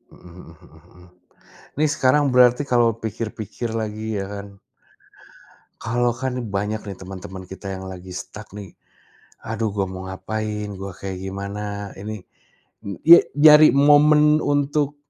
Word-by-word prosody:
Mhm - - -20 0.2
mhm 80 -1 -18
mhm 80 +1 -20
mhm, 90 0 -18 0.7
nih 155 +1 +2
sekarang 135 +3 +3
berarti 125 +1 +5
kalau 120 -2 +4
pikir-pikir 110 +1 -5
lagi 110 0 -5
ya 95 - -3
kan 100 0 -7 1.4
kalau 120 +2 0
kan 130 -1 -2
nih - - -6
banyak 105 +2 -2
nih 95 - -7
temen-temen 95 0 -9
kita 95 +2 -9
yang 95 - -8
lagi 95 0 -9
stuck 100 +3 -9
nih, 100 -4 -10 0.7
aduh 110 0 -2
gua 100 - 0
mau 95 0 -7
ngapain, 105 +2 -4
gua 95 -1 -7
kayak 95 -2 -6
gimana 100 +1 -6
ini, 105 -1 -7 0.6
eee, 100 -3 -6
ye 170 - +12 0.2
nyari 150 +1 +8
momen 150 +1 +5
untuk 145 0 0
105 Hz, 145 wpm, -22 LUFS, 95-125 Hz, 1.4 s, ye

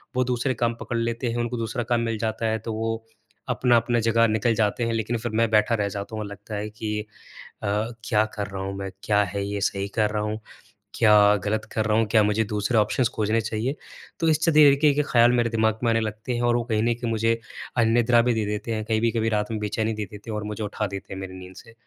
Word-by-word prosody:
वो 130 - +3
दूसरे 125 +2 0
काम 115 0 0
पकड़ 120 - -3
लेते 115 +1 -1
हैं 120 - -3
उनको 120 +1 -2
दूसरा 115 +1 -2
काम 120 0 0
मिल 115 -1 -1
जाता 110 0 -2
है 110 0 0
तो 110 +1 -5
वो 115 0 -2 0.5
अपना-अपना 120 0 +2
जगह 115 +1 +3
निकल 110 +2 +1
जाते 105 +2 +1
हैं, 115 - -1
लेकिन 115 +1 -1
फिर 120 0 -4
मैं 115 0 +3
बैठा 110 +2 +3
रह 100 -2 0
जाता 100 +2 -6
हूँ 110 - -3
और - - -6
लगता 105 +2 -8
है 105 +1 -3
कि 105 0 -4 0.6
अ, - - -1 0.4
क्या 105 -1 +3
कर 105 -1 -3
रहा 95 0 -6
हूँ 95 0 -4
मैं, 95 -1 -5
क्या 105 -1 +3
है 100 +1 -3
ये 100 0 -3
सही 100 0 -1
कर 105 -2 +2
रहा 105 - -1
हूँ? 105 +1 -3 0.6
क्या 105 -2 +6
गलत 110 +1 0
कर 110 -1 0
रहा 110 0 +2
हूँ? 115 - +3
क्या 110 - +5
मुझे 105 +2 +2
दूसरे 105 +2 -1
ऑप्शंस 115 +3 +2
खोजने 110 +1 +1
चाहिए? 110 +5 -2 0.4
तो 165 - +1
इस 155 - +3
च 165 - +4
दी 155 - +8
ए - - +4
के 150 -2 +6
ख़्याल 120 -3 +4
मेरे 120 -1 +2
दिमाग 110 -1 +1
में 120 - +3
आने 115 - +2
लगते 110 +3 -4
हैं 120 - -2
और 120 - +2
वो 120 - -1
कहीं 110 0 +2
न 120 0 +2
कहीं 120 -1 -3
मुझे 115 +1 +1 0.4
अनिद्रा 120 +1 +4
भी 120 +1 +1
दे 110 -2 -1
देते 105 +2 -3
हैं, 110 - -2
कभी-कभी 115 0 +1
रात 105 0 -1
में 110 - -2
बेचैनी 110 +1 -1
दे 105 -1 -4
देते 105 +2 -11
हैं - - -3
और 105 - -4
मुझे 105 - -5
उठा 105 0 -2
देते 100 0 -7
हैं 95 - -6
मेरी 95 -1 -7
नींद 90 0 -11
से। 115 +1 -14
110 Hz, 255 wpm, -24 LUFS, 105-115 Hz, 0.6 s, दी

